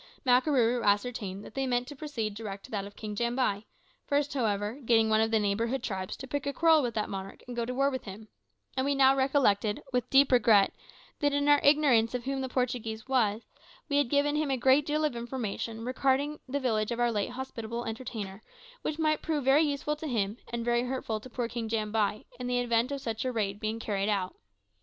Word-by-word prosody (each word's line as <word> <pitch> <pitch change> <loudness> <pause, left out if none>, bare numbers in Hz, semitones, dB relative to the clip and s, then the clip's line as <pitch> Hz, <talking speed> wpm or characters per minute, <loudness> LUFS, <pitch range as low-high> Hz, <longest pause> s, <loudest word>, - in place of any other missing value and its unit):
Makarooroo 250 -2 +3
ascertained 205 -2 0
that - - -11
they 270 -1 -1
meant 245 0 0
to 290 - -8
proceed 260 -8 -4
direct 200 -2 -7
to - - -15
that 200 -2 -2
of 200 - -11
King 210 -1 -6
Jambai, 235 -2 0 0.4
first, 290 0 +1
however, 215 -1 -1
getting 225 -2 +3
one 215 0 +4
of 225 - +2
the 225 - +3
neighbouring 220 +5 0
tribes 190 -6 -4
to 265 - -8
pick 285 +1 -3
a 280 - -1
quarrel 325 -1 +5
with 240 -4 -2
that 215 - -1
monarch 195 0 -7
and 245 - -7
go 235 -1 -1
to 250 - -4
war 275 +1 +2
with 260 -1 -5
him; 210 +2 -9 0.5
and 260 - +1
we 280 +1 +1
now 270 0 +5
recollected, 265 -7 +2
with 250 -2 0
deep 275 0 +5
regret, 215 -5 +5 0.5
that 290 -1 +1
in 285 0 +1
our 290 -1 +6
ignorance 270 -6 +4
of 245 -1 -4
what 270 0 -2
the 260 - -3
Portuguese 240 -3 -2
was, 230 -5 +1 0.5
we 285 - +2
had 285 -4 +2
given 290 +1 +2
him 300 -1 0
a 265 - +1
great 265 +4 +4
deal 305 +1 +1
of 295 - -1
information 230 -2 -4
regarding 275 +3 0
the 285 +2 -1
village 220 -5 0
of 235 0 -3
our 240 0 +2
late 205 0 -1
hospitable 240 -2 -5
entertainer 220 -4 -6 0.4
which 305 - -3
might 310 -1 +1
prove 305 -3 -1
very 275 +3 +5
useful 295 0 0
to 310 +1 -6
him, 215 -5 -1 0.2
and 235 -1 -3
very 240 0 +2
hurtful 245 -4 -3
to 255 - -12
poor 240 -1 -2
King 230 -1 -4
Jambai, 215 -1 0 0.2
in 250 - -4
the 250 0 0
event 240 +1 +1
of 280 -1 -3
such 225 -3 -3
a 255 - -1
raid 205 -4 -2
being 220 +1 -2
carried 200 -2 -1
out. 195 -3 -1
240 Hz, 220 wpm, -29 LUFS, 220-270 Hz, 0.5 s, our